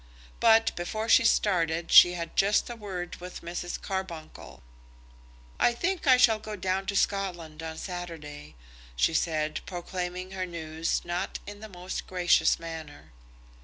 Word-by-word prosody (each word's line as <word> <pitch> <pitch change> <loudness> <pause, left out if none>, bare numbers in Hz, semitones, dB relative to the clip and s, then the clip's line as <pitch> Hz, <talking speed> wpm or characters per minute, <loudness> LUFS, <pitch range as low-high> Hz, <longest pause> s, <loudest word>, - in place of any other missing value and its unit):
But 225 0 +5
before 215 +6 -3
she 245 - +6
started 170 -7 +1
she 175 - +9
had 170 -2 -5
just 205 +4 +2
a - - -6
word 185 -5 -6
with 180 +1 -9
Mrs. 175 +1 -4
Carbuncle. 190 -5 -6 1.0
"I 240 - +4
think 355 +4 -2
I 255 -1 +7
shall 225 -3 +5
go 215 0 -6
down 190 0 -2
to 200 - -2
Scotland 175 -6 -1
on 160 0 -6
Saturday," 160 - -7 0.4
she 110 - +2
said, 155 -1 0
proclaiming 180 0 -5
her 185 -1 -3
news 160 -1 -3
not 175 +2 -3
in 205 0 -9
the 220 0 -9
most 180 -1 -6
gracious 175 -3 +3
manner. 160 - -9
180 Hz, 145 wpm, -28 LUFS, 165-200 Hz, 1.0 s, she